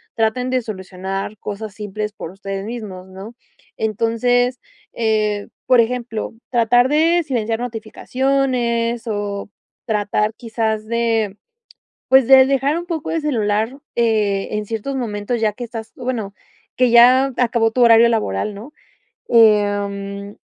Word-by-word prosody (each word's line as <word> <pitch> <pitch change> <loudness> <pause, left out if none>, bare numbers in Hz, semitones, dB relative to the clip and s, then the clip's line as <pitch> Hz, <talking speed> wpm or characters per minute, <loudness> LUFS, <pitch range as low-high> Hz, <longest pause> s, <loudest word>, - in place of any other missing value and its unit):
traten 225 +3 0
de 255 -1 0
solucionar 195 0 -5
cosas 205 0 -6
simples 210 0 -4
por 175 -5 -8
ustedes 195 0 -6
mismos, 210 -5 -7
¿no? 195 +5 -10 0.4
Entonces, 235 +3 +1 0.3
eh, 215 -2 0 0.2
por 250 -2 +5
ejemplo, 235 -1 -1 0.2
tratar 245 +1 +3
de 325 +4 +3
silenciar 230 -6 -2
notificaciones, 240 0 -1
o 205 -2 -3 0.4
tratar 210 0 0
quizás 220 -2 -2
de, 225 -3 0 0.7
pues 265 -2 +6
de 265 0 +8
dejar 275 +3 +1
un 345 - -5
poco 330 -4 -4
el 330 - -1
celular, 225 -3 0 0.2
eh, 215 -4 +1
en 210 0 -2
ciertos 225 +6 -4
momentos, 225 -1 -3
ya 215 -2 +1
que 245 - -7
estás, 225 -1 -7
bueno, 245 -6 -4 0.4
que 250 -1 +3
ya 250 +3 +6
acabó 230 -2 +2
tu 250 - 0
horario 235 0 +7
laboral, 210 - -1
¿no?, 230 +9 -10 0.6
em, 205 -2 +2
225 Hz, 130 wpm, -19 LUFS, 210-245 Hz, 0.7 s, de